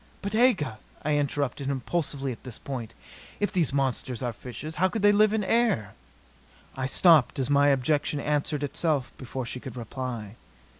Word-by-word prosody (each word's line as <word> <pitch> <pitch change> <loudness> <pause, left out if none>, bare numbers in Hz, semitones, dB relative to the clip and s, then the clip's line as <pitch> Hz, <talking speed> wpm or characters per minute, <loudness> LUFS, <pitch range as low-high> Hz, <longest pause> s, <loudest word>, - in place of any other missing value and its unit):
"But 200 +1 -3
Aga," 195 - +3 0.3
I 150 - +2
interrupted 140 -1 -1
impulsively 140 0 -2
at 120 - -9
this 125 -4 -7
point. 125 -5 -6 0.4
"If 205 - 0
these 170 -8 +2
monsters 130 -3 -1
are 120 -1 -1
fishes, 130 +8 -7
how 185 - +6
could 200 +3 -3
they 205 - +7
live 210 +1 +5
here 215 - -1
in 215 - 0
air 210 - +1 0.4
" - - -28
I 130 0 -2
stopped 160 -1 +5
as 135 0 -1
my 140 0 +5
objection 145 +2 +1
answered 150 0 -1
itself 145 -1 0
before 130 0 -5
she 125 - -5
could 130 -1 -8
reply. 120 -2 -5
140 Hz, 180 wpm, -27 LUFS, 125-165 Hz, 0.4 s, they